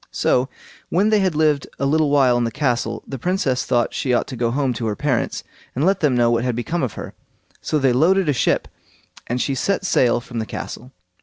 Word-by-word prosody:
So, 125 +2 +1 0.4
when 200 +5 +2
they 215 - +4
had 185 -5 0
lived 150 -2 +2
a 140 - -1
little 155 +1 +2
while 135 -4 +4
in 120 - +1
the 115 - 0
castle, 125 -2 -1
the 135 - -7
Princess 160 -6 0
thought 120 -2 +1
she 125 -2 0
ought - - +1
to 130 - -6
go 120 -1 0
home 130 +1 0
to 115 -1 -3
her 105 - -1
parents, 130 -3 -1 0.3
and 140 +5 +1
let 195 +1 +2
them 150 -6 +2
know 120 -1 +3
what 115 0 +1
had 125 -2 -1
become 165 +9 -2
of 130 -6 -2
her; - - -8 0.5
so 155 - -1
they 135 -3 +2
loaded 180 +7 +3
a 145 - +3
ship, 125 - +1 0.6
and 125 +1 -2
she 135 - 0
set 195 +8 -1
sail 120 -9 +3
from 120 0 -7
the 110 - -3
castle. 125 +2 -7
135 Hz, 230 wpm, -21 LUFS, 120-155 Hz, 0.6 s, they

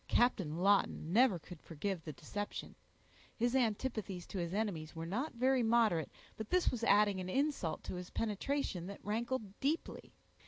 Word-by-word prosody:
Captain 190 -10 +2
Lawton 190 -3 +2
never 235 -4 +5
could 170 0 -11
forgive 175 +2 -3
the 155 - -5
deception; 205 +8 -5 0.6
his 240 +2 +1
antipathies 215 -6 0
to 195 - -5
his 170 -1 -2
enemies 185 -7 -2
were 165 0 -4
not 240 - -2
very 255 +2 +3
moderate, 225 - +3 0.3
but 220 -1 -5
this 365 -1 +3
was 235 -2 -4
adding 205 -2 +4
an 185 0 -4
insult 270 - 0
to - - -5
his 180 0 -6
penetration 215 -4 -2
that 200 - -9
rankled 220 -1 -2
deeply. 300 +5 -2
205 Hz, 160 wpm, -35 LUFS, 180-240 Hz, 0.6 s, never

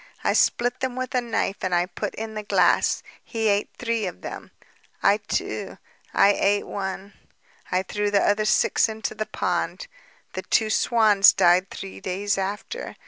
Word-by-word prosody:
I - - +2
split 245 +1 +2
them 260 -1 -2
with 255 -1 -4
a 250 - +2
knife 230 -4 -2
and 185 -1 +1
I 175 0 +2
put 175 -1 -5
in 220 0 -6
the 215 - -4
glass... 205 - +2 0.2
He 225 -2 -2
ate 200 0 +1
three 230 -3 -1
of 90 - -8
them... - - -8 0.5
I 200 +1 +5
too, 210 - -4 0.3
I 200 - +5
ate 205 +1 +1
one... 195 0 -5 0.6
I 185 +1 +1
threw 205 +2 -2
the 200 -1 +2
other 210 +1 +2
six 215 - +3
into 220 0 -4
the 215 - -4
pond. - - -2 0.5
The - - -4
two 220 -1 +1
swans 215 -4 +5
died 185 0 +3
three 95 0 -8
days 195 - -2
after 205 - -5
205 Hz, 170 wpm, -24 LUFS, 195-225 Hz, 0.6 s, I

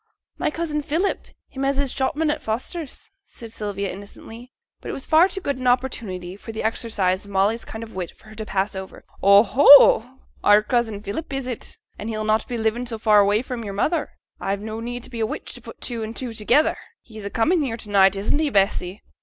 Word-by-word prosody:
'My - - +1
cousin 300 -1 -2
Philip, 325 +7 -1 0.2
him 270 - -6
as 275 0 +1
is 280 -2 0
shopman 295 +3 0
at 300 - -4
Foster's,' 260 +7 -5
said 230 - -11
Sylvia, 200 -3 -4
innocently. 225 +5 -11 0.3
But - - -8
it - - -3
was 270 - -5
far 325 +3 +5
too 385 0 -3
good 280 -6 -2
an 255 - -2
opportunity 205 -8 -1
for 210 - -9
the 220 - -5
exercise 210 -4 0
of 200 - -13
Molly's 200 +4 +1
kind 220 +1 -7
of 225 - -11
wit 180 -2 -4
for 215 - -18
her - - -12
to 220 0 -6
pass 195 -1 -1
over. 190 0 -8 0.2
'Oh, 200 +2 +7
oh! 265 -2 +7 0.2
our 205 +1 +6
cousin 225 -3 -1
Philip, 220 +11 -5
is 270 -1 -3
it? 250 -3 -6 0.2
and 215 - -5
he'll 215 -1 -3
not 215 +1 +1
be 245 - -3
living 225 +2 -1
so 230 -1 -4
far 215 -1 +4
away 205 +3 +3
from 250 -3 -5
your 200 -2 -6
mother? 305 +9 0 0.3
I've 195 +1 -2
no 220 +1 -5
need 245 +1 -5
be 235 - -6
a 220 - +1
witch - - -6
to - - -8
put - - -12
two 235 -2 -3
and 220 +1 -5
two 250 -3 -5
together. 235 +8 +2 0.3
He's 220 -3 -11
a 200 - -4
coming 315 - +2
here 245 -5 -2
to 215 - -10
night, 195 -1 +5
isn't 205 +9 0
he, 310 -2 +1
Bessy?' 195 -3 0
225 Hz, 225 wpm, -23 LUFS, 205-265 Hz, 0.3 s, Oh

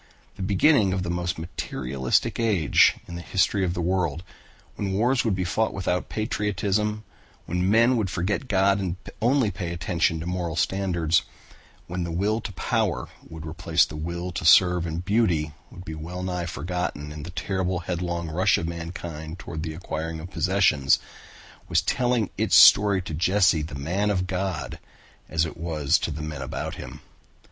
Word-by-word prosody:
The - - -9
beginning 100 +2 +3
of 95 -1 -1
the 85 - -2
most 90 +2 -2
materialistic 65 - -1
age 105 -10 +4
in 85 - -9
the 85 - -5
history 95 +2 +1
of 90 -1 -1
the 85 - -2
world, 85 -2 0 0.5
when 100 -2 -2
wars 120 +6 +2
would 110 -5 +1
be 95 - -1
fought 110 +5 0
without 90 -1 -1
patriotism, 105 0 -1 0.4
when 90 +2 0
men 115 +4 +4
would 105 -4 0
forget 100 +9 -2
God 100 -2 +3
and 90 -3 -2 0.3
only 120 -2 +3
pay 90 -5 -4
attention 85 -1 0
to 80 - -5
moral 90 -2 -2
standards, 85 -2 +1 0.6
when 90 0 -4
the 85 - -4
will 105 +6 0
to 105 - -6
power - - -1 0.2
would 80 -1 -8
replace 80 +1 +2
the 75 - -9
will 85 +3 -4
to 90 - -4
serve 90 +1 +5
and 85 +2 -4
beauty 90 -8 +1 0.2
would 90 +1 -12
be 80 - -6
well 85 +4 -6
nigh 90 -2 -2
forgotten 85 -2 -4
in 75 0 -7
the 75 - -7
terrible 95 0 -2
headlong 85 -1 -3
rush 85 +4 +2
of 80 - -3
mankind 85 -1 -6
toward 80 -3 -6
the 80 -1 -4
acquiring 80 -1 -4
of 85 +4 -9
possessions, 90 -8 +3 0.7
was - - +2
telling 125 -5 +1
its - - +3
story 100 -2 +7
to 80 - -6
Jesse 90 0 +3
the 75 -1 -6
man 90 +9 -1
of 90 -3 0
God 95 -2 -3 0.5
as 80 0 +1
it 80 - -7
was 80 -4 +1
to - - -2
the 75 0 -5
men 75 -2 -5
about 65 - -4
him. - - -9
90 Hz, 175 wpm, -25 LUFS, 80-100 Hz, 0.7 s, story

